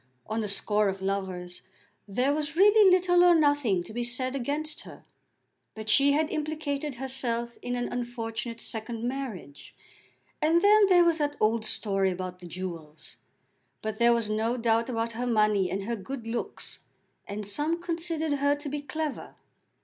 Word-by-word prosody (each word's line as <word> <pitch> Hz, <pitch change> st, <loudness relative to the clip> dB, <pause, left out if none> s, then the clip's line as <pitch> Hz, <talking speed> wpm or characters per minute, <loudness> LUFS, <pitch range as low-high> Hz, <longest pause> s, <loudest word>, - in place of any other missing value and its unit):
On 220 Hz, +1 st, -3 dB
the 215 Hz, -, -2 dB
score 205 Hz, +1 st, +1 dB
of 190 Hz, 0 st, -5 dB
lovers 185 Hz, -2 st, -3 dB, 0.5 s
there 250 Hz, +8 st, +1 dB
was 300 Hz, 0 st, -3 dB
really 410 Hz, +2 st, +6 dB
little 355 Hz, -1 st, +4 dB
or 350 Hz, -1 st, +7 dB
nothing 285 Hz, -, +2 dB
to 215 Hz, -, -11 dB
be 240 Hz, -, -2 dB
said 255 Hz, +2 st, +1 dB
against 295 Hz, +4 st, -2 dB
her; -, -, -12 dB, 0.7 s
but 220 Hz, 0 st, -7 dB
she 280 Hz, 0 st, +5 dB
had 310 Hz, +1 st, +1 dB
implicated 300 Hz, -2 st, -3 dB
herself 240 Hz, -2 st, -3 dB
in 245 Hz, 0 st, -3 dB
an 245 Hz, 0 st, -2 dB
unfortunate 235 Hz, -1 st, -4 dB
second 225 Hz, +1 st, -5 dB
marriage, 240 Hz, -, -6 dB, 0.7 s
and 330 Hz, +3 st, +3 dB
then 415 Hz, 0 st, +6 dB
there 360 Hz, -2 st, +6 dB
was 335 Hz, -1 st, +2 dB
that 290 Hz, -1 st, -1 dB
old 220 Hz, +1 st, +2 dB
story 195 Hz, -3 st, +1 dB
about 180 Hz, 0 st, -5 dB
the 175 Hz, -, -10 dB
jewels! 165 Hz, -4 st, -8 dB, 0.7 s
But 220 Hz, -1 st, -4 dB
there 235 Hz, 0 st, +5 dB
was 235 Hz, -2 st, +1 dB
no 220 Hz, +3 st, 0 dB
doubt 230 Hz, 0 st, +1 dB
about 230 Hz, -1 st, -2 dB
her 245 Hz, +2 st, -3 dB
money 210 Hz, -5 st, +2 dB
and 195 Hz, +1 st, -3 dB
her 235 Hz, +3 st, -2 dB
good 230 Hz, +4 st, -7 dB
looks, 230 Hz, +1 st, -5 dB, 0.5 s
and 205 Hz, +1 st, -5 dB
some 300 Hz, +10 st, 0 dB
considered 330 Hz, -3 st, -2 dB
her 285 Hz, +1 st, +3 dB
to 290 Hz, 0 st, -6 dB
be 295 Hz, +1 st, -4 dB
clever. 310 Hz, 0 st, -5 dB
240 Hz, 165 wpm, -28 LUFS, 215-295 Hz, 0.7 s, or